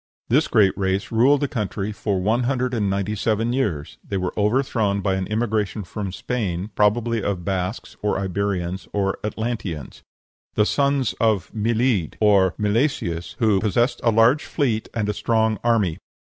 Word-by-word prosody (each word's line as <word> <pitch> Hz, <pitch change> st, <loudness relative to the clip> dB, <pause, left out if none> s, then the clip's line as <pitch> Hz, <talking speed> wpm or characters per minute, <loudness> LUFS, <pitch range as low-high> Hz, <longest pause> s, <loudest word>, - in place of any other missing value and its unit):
This 145 Hz, +6 st, +3 dB
great 105 Hz, -5 st, +3 dB
race 95 Hz, 0 st, -1 dB
ruled 130 Hz, +5 st, +4 dB
the 145 Hz, -, +1 dB
country 105 Hz, -5 st, -3 dB
for 100 Hz, -1 st, -2 dB
one 110 Hz, +6 st, +1 dB
hundred 125 Hz, -1 st, 0 dB
and 105 Hz, -4 st, 0 dB
ninety 100 Hz, +1 st, -1 dB
seven 110 Hz, +3 st, 0 dB
years: 95 Hz, -, -2 dB
they 100 Hz, -, -3 dB
were 90 Hz, -1 st, -2 dB
overthrown 105 Hz, -2 st, +1 dB
by 95 Hz, -1 st, 0 dB
an 95 Hz, -1 st, -2 dB
immigration 110 Hz, -1 st, -1 dB
from 95 Hz, +2 st, -5 dB
Spain, 100 Hz, -3 st, -3 dB
probably 115 Hz, +2 st, +2 dB
of 95 Hz, -3 st, -2 dB
Basques, 95 Hz, +2 st, -3 dB
or 105 Hz, -, 0 dB
Iberians, 95 Hz, -1 st, -2 dB
or 95 Hz, -1 st, 0 dB
Atlanteans, 105 Hz, -, -4 dB, 0.5 s
"the 105 Hz, -, +4 dB
sons 140 Hz, -1 st, +1 dB
of 110 Hz, -4 st, +1 dB
Milidh," 115 Hz, -, 0 dB
or 100 Hz, -4 st, +4 dB
Milesius, 105 Hz, -, -1 dB
who 110 Hz, -4 st, +3 dB
"possessed 115 Hz, +6 st, +1 dB
a 115 Hz, -, +4 dB
large 115 Hz, +6 st, +4 dB
fleet 120 Hz, -8 st, -1 dB
and 110 Hz, -3 st, 0 dB
a 105 Hz, -, 0 dB
strong 110 Hz, 0 st, +1 dB
army." 110 Hz, -8 st, +1 dB
105 Hz, 160 wpm, -22 LUFS, 95-115 Hz, 0.5 s, ruled